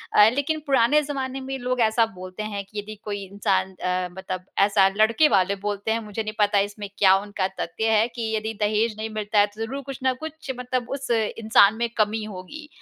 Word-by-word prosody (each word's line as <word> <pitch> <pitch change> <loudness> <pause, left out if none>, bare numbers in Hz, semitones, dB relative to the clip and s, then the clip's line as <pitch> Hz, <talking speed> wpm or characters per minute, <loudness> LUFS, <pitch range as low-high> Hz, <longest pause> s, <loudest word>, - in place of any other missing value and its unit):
अ, 210 +1 +8
लेकिन 295 +4 -1
पुराने 270 +2 +4
ज़माने 270 -2 -4
में 270 0 -4
लोग 250 0 -2
ऐसा 225 +1 +4
बोलते 185 +3 -7
हैं 205 -2 -4
कि 205 +2 -7
यदि 215 +1 -7
कोई 205 -1 -4
इंसान 190 -1 0
अ, 180 0 -2
मतलब 185 0 -6 0.2
ऐसा 200 -1 +4
लड़के 230 +8 +5
वाले 195 -1 +3
बोलते 205 +2 -3
हैं 225 - +1
मुझे 210 +1 -4
नहीं 215 0 -5
पता 205 -1 +4
इसमें 205 0 -3
क्या 190 -1 +6
उनका 205 -2 -2
तथ्य 220 +7 -1
है 220 +2 +3
कि 225 -2 -3
यदि 220 +1 -2
दहेज 215 +1 +1
नहीं 220 0 -4
मिलता 215 -1 0
है 205 - +5
तो 220 - -8
ज़रूर 270 +5 -5
कुछ 270 0 -7
ना 260 0 +3
कुछ 315 -3 -6
मतलब 250 -1 -2
उस 275 0 -5
इंसान 220 -2 +4
में 235 - 0
कमी 215 0 +1
होगी। 215 +10 -8
215 Hz, 210 wpm, -24 LUFS, 200-245 Hz, 0.2 s, अ